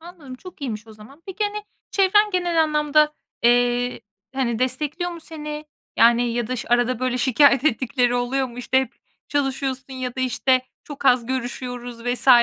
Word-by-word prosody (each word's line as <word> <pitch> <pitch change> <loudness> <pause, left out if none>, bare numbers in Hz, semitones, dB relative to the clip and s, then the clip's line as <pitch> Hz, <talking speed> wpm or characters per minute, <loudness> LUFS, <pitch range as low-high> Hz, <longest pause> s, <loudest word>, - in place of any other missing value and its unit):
Anladım. 325 -6 -11
Çok 360 +7 -13
iyiymiş 225 -5 -5
o 220 - -13
zaman. 220 +9 -16
Peki, 390 +2 -2
hani, 415 0 -3 0.3
çevren 415 +2 +4
genel 350 -3 +2
anlamda, 300 0 +2 0.3
eee, 245 +1 +2 0.3
hani, 240 -4 -1
destekliyor 300 +8 -2
mu 340 -1 -8
seni? 300 -1 -7 0.3
Yani, 235 +1 +4
ya 240 -1 -1
da 255 +3 -3
ş 245 - -6
arada 245 0 +2
böyle 255 0 -1
şikâyet 275 +1 +4
ettikleri 245 -2 +1
oluyor 250 +2 0
mu? 240 -1 -11
İşte, 255 +1 +1
hep 265 - -5 0.3
çalışıyorsun 270 -1 -2
ya 255 -1 -4
da, - - -2
işte, 255 0 +2 0.2
çok 290 -2 -9
az 250 -3 +4
görüşüyoruz 245 -1 -5
vs. 245 +1 -1
260 Hz, 170 wpm, -22 LUFS, 245-300 Hz, 0.3 s, çevren